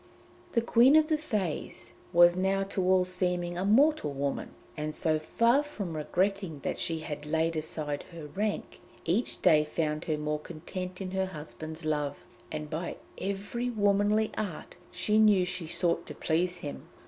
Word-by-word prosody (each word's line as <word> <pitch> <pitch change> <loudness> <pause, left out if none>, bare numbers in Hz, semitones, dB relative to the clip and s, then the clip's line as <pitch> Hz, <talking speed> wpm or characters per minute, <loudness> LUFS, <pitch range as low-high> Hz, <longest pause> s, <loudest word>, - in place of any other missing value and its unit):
The 235 - +2
Queen 245 +4 +6
of 310 0 +5
the 315 - +4
Fées 215 - -3 0.2
was 175 0 +7
now 190 +1 +1
to 195 0 -2
all 185 0 +4
seeming 180 -1 -1
a 180 - -2
mortal 225 - +4
woman, 140 0 -2 0.3
and 155 0 -3
so 155 -1 +1
far 235 - +3
from 205 - -5
regretting 185 +1 -1
that - - -3
she 165 -1 -1
had 150 -2 -6
laid 160 +1 +1
aside 150 -2 -2
her 165 -3 -8
rank, 205 +7 -3 0.2
each 190 +9 0
day 155 -1 +6
found 150 0 -2
her 155 -2 0
more 150 0 -2
content 180 +4 -6
in 185 -1 -4
her 190 0 0
husband's 155 -1 -8
love, 150 -2 -1 0.3
and 155 0 -4
by 160 +3 -4 0.2
every 200 +6 -3
womanly 205 0 +2
art 195 -7 -5 0.2
she 210 +4 +2
knew 205 -4 +5
she 180 -2 -3
sought 170 +1 0
to - - -7
please 175 +3 0
him. 145 - -7
180 Hz, 165 wpm, -29 LUFS, 155-200 Hz, 0.3 s, was